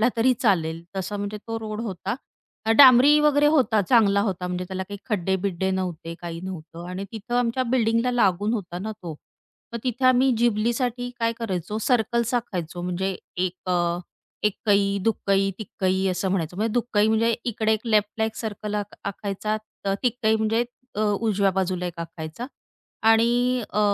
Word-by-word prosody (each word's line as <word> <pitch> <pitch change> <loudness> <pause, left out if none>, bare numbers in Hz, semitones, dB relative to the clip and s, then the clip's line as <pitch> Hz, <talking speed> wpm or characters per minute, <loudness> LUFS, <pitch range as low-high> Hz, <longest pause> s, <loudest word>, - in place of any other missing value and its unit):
म्हटला 230 - +5
तरी 240 +3 +4
चालेल, 165 -8 0
तसा 190 +2 -3
म्हणजे 205 +1 -4
तो 225 - -2
रोड 215 0 -5
होता. 195 -1 -3 0.5
अ, 225 - +2
डांबरी 270 +2 +9
वगैरे 295 -1 +4
होता 255 -8 +3
चांगला 200 -4 +5
होता, 185 -4 -2
म्हणजे 180 0 -3
त्याला 190 0 -3
काही 205 0 -6
खड्डे-बिड्डे 190 -1 0
नव्हते, 175 -3 -3
काही 170 -1 -5
नव्हतं 170 -2 -7
आणि 185 +2 -4
तिथं 225 +2 -5
आमच्या 245 +1 +1
बिल्डिंगला 230 0 +2
लागून 205 -2 +2
होता 175 -5 -4
ना 215 +3 -4
तो. 165 -3 -5 0.6
मग 235 - -3
तिथं 255 +1 0
आम्ही 255 +1 +5
झिबलीसाठी 240 +2 0
काय 230 0 +2
करायचो, 210 -2 -3
सर्कल्स 235 0 +1
आखायचो. 180 -7 -3
म्हणजे 180 +1 -2 0.2
एक 185 0 -2
अ, 180 - +3 0.7
एक्कई, 200 -1 +2
दुक्कई, 195 -3 +1
तिक्कई 190 -2 -1
असं 185 +1 -1
म्हणायचो. 175 -2 -2
म्हणजे 220 +1 0
दुक्कई 220 -3 +2
म्हणजे 225 +1 +3 0.2
इकडे 220 0 +1
एक 220 +2 -2
लेफ्टला 210 +1 +2
एक 220 0 -4
सर्कल 210 -1 -4
आक - - -14
आखायचा, 200 +2 -3 0.3
तर 195 - 0
अ, - - +2
तिक्कई 240 -3 +2
म्हणजे 220 +2 +1 0.3
अ, 210 - -2
उजव्या 205 -1 +2
बाजूला 185 -1 -1
एक 175 -1 -7
आखायचा 165 +6 -6 0.6
आणि 240 +2 +3
अ, 210 - 0
210 Hz, 165 wpm, -24 LUFS, 190-230 Hz, 0.7 s, डांबरी